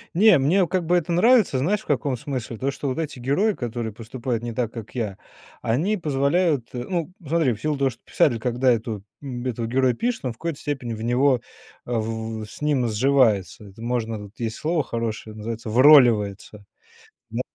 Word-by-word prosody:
Не, 200 -4 +6
мне 175 +7 +3
как 185 -2 -1
бы 175 +2 +2
это 170 0 -2
нравится. 200 - +4
Знаешь 205 +10 +1
в - - -18
каком 135 -5 0
смысле? 125 -3 -5
То, 135 +4 -1
что 140 - -5
вот 130 - -3
эти 155 -5 -4
герои, 165 - +1
которые 120 - -4
поступают 115 +1 -4
не 120 -1 -4
так, 115 -1 -1
как 115 +1 -9
я, 105 -5 -3 0.4
они 170 - +1
позволяют, 145 -2 +1
э 120 -1 -4
Ну, 175 +2 -3
смотри, 155 -5 +2
в 105 - -10
силу 150 -2 -1
того 135 -1 +2
что - - -17
писатель, 120 -6 +2
когда 125 +2 +2
эту 110 -3 -2 0.2
м, 125 -3 -6
этого 115 -2 -2
героя 130 +1 +2
пишет, 235 - -2
он 125 - 0
в - - -24
какой-то 165 -4 -4
степени 135 -5 -3
в 110 - -7
него, 125 +1 +3 0.4
э, 120 - -7
в 110 0 -3
в - - -5
с 110 - -13
ним 140 -5 +1
сживается. 110 -4 +2
Это 100 +3 -14
можно, 115 -2 -2
вот 105 +3 -12
есть 115 -1 -2
слово 160 -1 0
хорошее- 115 -2 -4
называется 110 +1 -5
"вроливается". 110 -6 +5 0.6
На - - -2
125 Hz, 200 wpm, -23 LUFS, 115-150 Hz, 0.6 s, Не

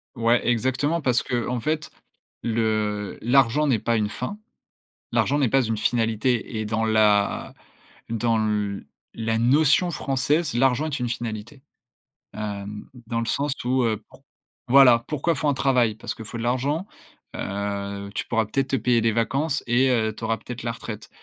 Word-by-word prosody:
Ouais, 115 +1 +2
exactement, 130 +7 +1
parce 125 -3 +2
qu'en 120 0 -2
fait, 155 +5 -2 0.5
le 110 -3 -1
l'argent 135 +4 +3
n'est 120 -6 +2
pas 115 +2 0
une 105 -1 +1
fin. 125 - -5 0.7
L'argent 145 - +2
n'est 130 -5 +2
pas 135 - +4
une 115 - -1
finalité 115 +1 0
et 110 - -2
dans 110 +1 0
la 105 -2 +2 0.6
dans 115 0 +1
le 105 -2 -1 0.3
la 115 0 -1
notion 150 +8 +4
française, 145 +2 0
l'argent 130 +4 +2
est 150 -4 -3
une 120 -1 -2
finalité. 120 +3 -5 0.7
Hem, 105 -1 -6 0.2
dans 115 0 -1
le 115 - -2
sens 140 +4 0
où, 130 0 +2
heu, 110 -2 0
pour - - -19 0.5
voilà, 125 -3 +7
pourquoi 155 +3 0
il - - -6
faut 155 - -1
un - - +2
travail? 125 -5 +2
Parce 110 - -5
que 110 - -8
faut 115 +2 -7
de 115 - -4
l'argent. 140 - 0 0.5
Heu, 100 0 -4
tu - - -2
pourras 115 -2 +1
peut-être 135 +5 -1
te 135 - +1
payer 120 0 +2
des 115 - +2
vacances 135 +7 0
et 125 +3 +3
heu, 110 -3 +1
tu - - -10
auras 115 0 0
peut-être 120 +2 -8
la 120 - -1
retraite. 115 -2 -8
115 Hz, 170 wpm, -24 LUFS, 110-135 Hz, 0.7 s, voilà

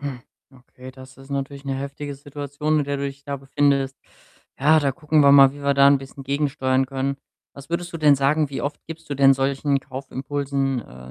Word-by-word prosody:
Hm. 140 -3 -5 0.3
Okay, 130 0 -14
das 130 0 -14
ist 135 +1 -15
natürlich 140 0 -4
'ne 135 - -2
heftige 140 +1 -6
Situation, 145 +2 -3
in - - -1
der 140 0 -2
du 140 - -3
dich 140 0 -7
da 140 0 -4
befindest. 135 0 0 0.6
Ja, 155 +3 +5
da 140 -3 +1
gucken 155 0 +1
wir 140 -1 +6
mal, 135 -1 +7
wie 145 0 -11
wir 140 0 +2
da 140 0 +6
'n 140 0 +5
bisschen 135 +1 -11
gegensteuern 135 -1 0
können. 135 +1 -2 0.4
Was 140 +2 -13
würdest 170 0 -3
du - - -4
denn 150 -2 +5
sagen, 140 +2 +1
wie 135 - -4
oft 145 +1 -4
gibst 165 0 -10
du - - -1
denn 135 0 +5
solchen 135 +1 0
Kaufimpulsen, 135 0 -3
äh, 65 -4 -13
140 Hz, 210 wpm, -22 LUFS, 135-145 Hz, 0.6 s, mal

